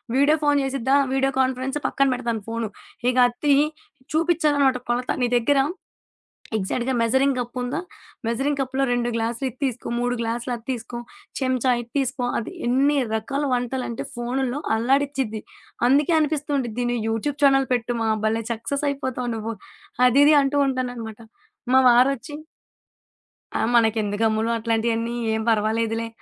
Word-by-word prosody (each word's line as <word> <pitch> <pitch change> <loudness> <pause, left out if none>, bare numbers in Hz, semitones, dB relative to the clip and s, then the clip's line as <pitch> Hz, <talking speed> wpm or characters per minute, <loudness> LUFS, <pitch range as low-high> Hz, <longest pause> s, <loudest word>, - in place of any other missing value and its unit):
Video 285 +4 +4
phone 290 -1 +3
జేసిద్దా 270 0 +1 0.2
video 270 0 +2
conference 260 +1 0
పక్కన 275 - +2
పెడతాను 235 -4 -3
phone. 230 -1 -2 0.4
ఇగ 250 - 0
అదతీయి 285 +4 +2 0.5
చూపిచ్చాలనమాట 300 -5 +2
కొలత 245 +1 0
నీ - - +3
దెగ్గర 275 +4 +2 1.0
ఎగ్జాక్ట్‌గా 240 +6 -1
మెజరింగ్ 265 +3 +2
గప్పుందా? 245 +1 -3 0.5
మెజరింగ్ 270 +5 0
కప్పులో 265 0 -1
2 240 0 0
గ్లాసులు 230 +3 -2
ఇది 255 - -16
తీసుకో, 255 -3 -2
3 245 0 0
గ్లాసులు 235 +2 -3
అది 230 - -12
తీసుకో 240 -1 -5 0.4
చెంచా 255 -1 +1
ఇది 235 - -14
తీసుకో 260 -2 -1
అది 225 - -6 0.2
ఎన్ని 280 +4 +3 0.2
రకాల 270 +6 -2
వంటలంటే 245 0 -2
ఫోను‌ల్లో 250 +2 -2 0.2
అల్లాడిచ్చిద్ది. 265 -2 0 0.5
అందుకే 290 +5 +3
అనిపిస్తూ 300 -1 -1
ఉండిద్ది 245 -2 -2
నువ్వు 235 -3 -2
యూట్యూబ్ 275 +7 -2
ఛానెల్ 270 -1 +5
పెట్టు 240 0 -1
మా 220 - +1 0.2
భల్లే 225 +1 0
సక్సెస్ 280 +6 -3
అయిపోతావు 260 -3 -3
నువ్వు. 225 +1 -4 0.5
అది 255 +3 +4
ఇది 300 +1 +6
అంటూ 275 +1 +1
ఉంటాననమాట. 245 -4 -4 0.5
మా 260 - +7
వారొచ్చి 265 +4 +3 1.2
"ఆ! - - -1 0.2
మనకెందుకు 220 -2 +1
అమ్ములు 220 +1 0
అట్లాంటియన్నీ 230 +1 -1 0.2
ఏం 220 - -1
పర్వాలేదులే," 225 +1 0
250 Hz, 135 wpm, -23 LUFS, 230-275 Hz, 1.2 s, మా